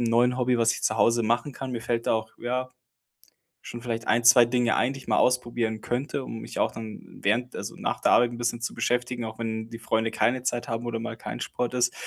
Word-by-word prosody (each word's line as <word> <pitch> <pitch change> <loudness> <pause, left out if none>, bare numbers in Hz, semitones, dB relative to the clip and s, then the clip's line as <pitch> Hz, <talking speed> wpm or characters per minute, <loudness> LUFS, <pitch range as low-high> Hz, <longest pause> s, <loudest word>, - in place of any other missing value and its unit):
'nem 115 -1 +1
neuen 125 +2 +3
Hobby, 125 -1 +2
was 115 0 +4
ich - - -6
zu 110 - +1
Hause 115 +1 +3
machen 120 +5 0
kann. 130 0 -6
Mir 120 -2 -3
fällt 115 0 -2
da - - +4
auch, 110 0 -3
ja, 125 +2 -2 0.9
schon 120 - -8
vielleicht 115 -2 -4
1, 120 0 +3
2 120 0 +8
Dinge 120 -1 +1
ein, 130 +3 +2
die 135 - -8
ich - - -15
mal - - +3
ausprobieren 120 -3 +1
könnte, 135 +2 -2
um 115 - -6
mich - - -7
auch - - +2
dann 110 -2 -9
während 120 +5 0
also - - -5
nach - - -2
der - - +4
Arbeit 120 0 +5
'n 120 - -7
bisschen 120 0 -1
zu 120 - -3
beschäftigen, 125 -1 -1
auch 110 0 -7
wenn 110 -1 -3
die 115 -1 -8
Freunde 110 0 0
keine 125 +1 +1
Zeit 120 -2 -2
haben 115 +1 -3
oder 115 -1 -2
mal 115 - -5
kein - - -6
Sport 125 0 -2
ist, 125 0 +2
120 Hz, 250 wpm, -26 LUFS, 115-125 Hz, 0.9 s, 2